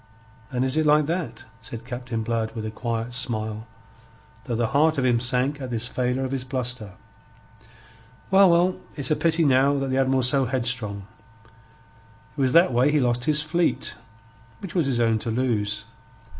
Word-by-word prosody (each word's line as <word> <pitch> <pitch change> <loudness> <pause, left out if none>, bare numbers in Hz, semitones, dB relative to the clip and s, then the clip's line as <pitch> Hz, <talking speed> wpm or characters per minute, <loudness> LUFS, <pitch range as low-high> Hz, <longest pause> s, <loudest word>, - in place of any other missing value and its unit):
"And 125 0 -1
is 130 +3 -1
it 155 - +2
like 150 0 +4
that?" 155 -8 -4 0.2
said 115 0 -8
Captain 120 -2 -4
Blood 115 -1 -2
with 110 -1 -4
a 110 - -4
quiet 115 +1 -4
smile, 110 -3 -1 0.8
though 120 - -2
the 115 -1 0
heart 155 +2 +3
of 130 - +1
him 120 -2 +3
sank 130 +4 0
at 130 - -5
this 120 -1 -2
failure 125 +1 -1
of 130 - -5
his 135 -2 -2
bluster. 125 -5 -3 1.4
"Well, 195 0 +6
well, 175 +2 +3 0.2
it's 140 -2 -3
a - - +4
pity 165 0 +1
now 140 +1 +3
that 135 -1 -2
the 130 - +1
Admiral's 130 -1 +2
so 135 0 +2
headstrong. 120 -6 -2 1.3
It - - -3
was 130 -1 +2
that 170 -5 +5
way 125 +5 +3
he 150 - +2
lost 125 -1 0
his 150 -1 +1
fleet, 165 +3 0 0.6
which 195 - -9
was 170 -6 +1
his 125 -3 0
own 115 -1 +2
to 115 - -4
lose. 115 -4 -1
130 Hz, 180 wpm, -24 LUFS, 115-145 Hz, 1.4 s, Well